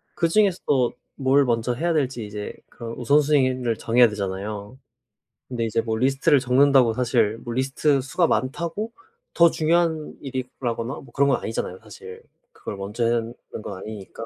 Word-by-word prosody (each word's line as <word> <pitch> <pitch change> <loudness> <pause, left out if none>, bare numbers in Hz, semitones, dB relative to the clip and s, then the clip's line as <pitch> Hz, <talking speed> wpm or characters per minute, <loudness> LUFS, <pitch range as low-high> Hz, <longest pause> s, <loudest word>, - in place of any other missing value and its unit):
그중에서도 165 - +2 0.2
뭘 135 +1 +3
먼저 120 0 0
해야 165 +7 0
될지 130 -6 -1
이제 105 0 -6 0.2
그 120 - -11
우선순위를 130 -3 +2
정해야 120 +1 +4
되잖아요. 100 +3 -5 0.7
근데 120 -3 -2
이제 115 +1 0
뭐 110 -1 -2
리스트를 135 +3 +3
적는다고 130 -2 +4
사실 115 -3 +1
뭐 120 - -5
리스트 135 +2 +1
수가 165 +6 +1
많다고 170 - -2 0.4
더 170 -1 +6
중요한 160 -1 0
일이라거나 125 -2 -4
뭐 - - -11
그런 140 0 +3
건 135 - +2
아니잖아요, 95 -4 -4
사실 95 -4 -12 0.3
그걸 - - -7
먼저 105 +5 -3
해야 120 +1 +2
하는 115 +1 -4 0.3
건 100 - -6
아니니까. 110 +2 -8
125 Hz, 355 characters per minute, -23 LUFS, 115-140 Hz, 0.7 s, 더